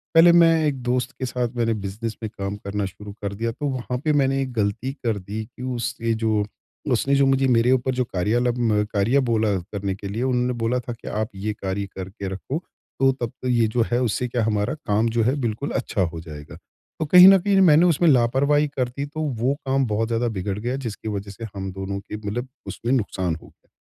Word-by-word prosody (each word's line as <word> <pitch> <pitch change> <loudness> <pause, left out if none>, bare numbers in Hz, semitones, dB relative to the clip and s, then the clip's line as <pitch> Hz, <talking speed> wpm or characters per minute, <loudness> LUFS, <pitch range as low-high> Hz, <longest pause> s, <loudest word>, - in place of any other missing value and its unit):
पहले 165 +1 +8
मैं 170 -1 +6
एक 140 -3 -1
दोस्त 125 +2 0
के 130 - -1
साथ 125 -1 -1
मैंने 115 -1 +1
बिज़नेस 105 +2 -4
में 110 - -2
काम 100 0 -3
करना 100 0 -3
शुरू 100 +2 -8
कर 100 -1 -3
दिया 115 +3 -2
तो 145 - -6
वहाँ 125 -1 -3
पे 155 - +3
मैंने 135 -1 +2
एक 130 -1 -3
गलती 110 +4 -1
कर 115 -6 -2
दी 105 +4 -5
कि 115 - -15
उसके 120 -1 -2
जो 110 -2 +2 0.5
उसने 135 +3 +2
जो 140 0 +4
मुझे 135 0 +3
मेरे 120 0 +4
ऊपर 130 0 +2
जो 125 - +1
कार्यालम 115 +2 +1
कार्य 110 +7 +3
बोला 115 -5 +1
करने 95 +2 -4
के 100 0 -7
लिए, 110 +5 -3
उन्होंने 125 -1 +1
बोला 115 +2 +1
था 120 0 -6
कि, 115 - -13
"आप 110 +1 -2
ये 105 +2 -3
कार्य 100 0 -3
करके 95 +2 -6
रखो 100 +11 -4 0.4
तो 135 0 +5
तब 125 -3 -4
तो 130 - -3
ये 120 -3 +3
जो 120 - +2
है 120 +1 +2
उससे 125 +1 0
क्या 120 -1 -1
हमारा 105 -2 0
काम 115 -6 0
जो 115 - +3
है, 125 +5 +2
बिल्कुल 120 +4 -2
अच्छा 115 -5 -1
हो 85 -2 -1
जाएगा।" 75 -2 -10 0.4
तो 160 - 0
कहीं 180 +4 +9
न 195 0 +9
कहीं 200 +2 +1
ना 195 - +5
मैंने 165 -1 +6
उसमें 175 0 +3
लापरवाही 140 +3 +3
कर 125 -2 +1
दी 140 +3 -4
तो 155 +2 -6 0.2
वो 130 +3 +2
काम 135 0 +2
बहुत 110 +1 0
ज़्यादा 115 +1 0
बिगड़ 95 +1 -2
गया 120 +4 -2
जिसकी 110 0 -7
वजह 100 0 -7
से 105 +4 -8
हम 95 -1 -4
दोनों 95 +1 -4
के 105 +1 -7
मतलब 110 +4 -4 0.2
उसमें 120 - -3
नुकसान 95 -8 0
हो - - -14
गया। - - -25
115 Hz, 225 wpm, -23 LUFS, 105-130 Hz, 0.5 s, कहीं